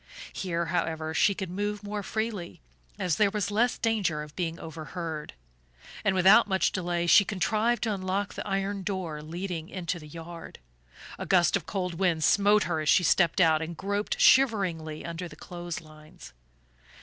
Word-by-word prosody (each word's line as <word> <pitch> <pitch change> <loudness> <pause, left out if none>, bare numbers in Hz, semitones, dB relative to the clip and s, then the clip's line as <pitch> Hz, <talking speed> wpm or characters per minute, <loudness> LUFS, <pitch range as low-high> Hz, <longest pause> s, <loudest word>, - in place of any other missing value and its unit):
Here, 170 -2 -2
however, 160 -2 -2
she 200 +6 +3
could 190 -3 -5
move 205 +2 -3
more 205 0 -4
freely, 215 -3 -4 0.4
as 170 -4 0
there 210 -2 +4
was 205 -1 -2
less 240 +4 +2
danger 200 -10 0
of 150 0 -13
being 170 -2 -3
overheard; 160 0 -6 0.7
and 195 -2 +2
without 190 +5 +6
much 190 -2 +1
delay 175 -2 -1
she 175 +4 +7
contrived 215 +4 0
to 220 -3 0
unlock 190 +1 -2
the - - -6
iron 195 0 -1
door 185 -6 -4
leading 170 +1 -5
into 175 -2 -4
the 150 - -12
yard. 165 +2 -9 0.6
A - - -5
gust 175 -4 +4
of - - -3
cold 180 -3 -2
wind 170 -4 +1
smote 205 +5 +4
her 165 -3 -1
as 155 -1 -1
she 185 - +5
stepped 175 +2 +3
out 160 -3 +4
and 160 0 -5
groped 200 +1 -2
shiveringly 185 - +3
under 170 +1 -5
the - - -12
clothes 175 -2 -7
lines. 155 - -15
180 Hz, 170 wpm, -28 LUFS, 165-200 Hz, 0.7 s, she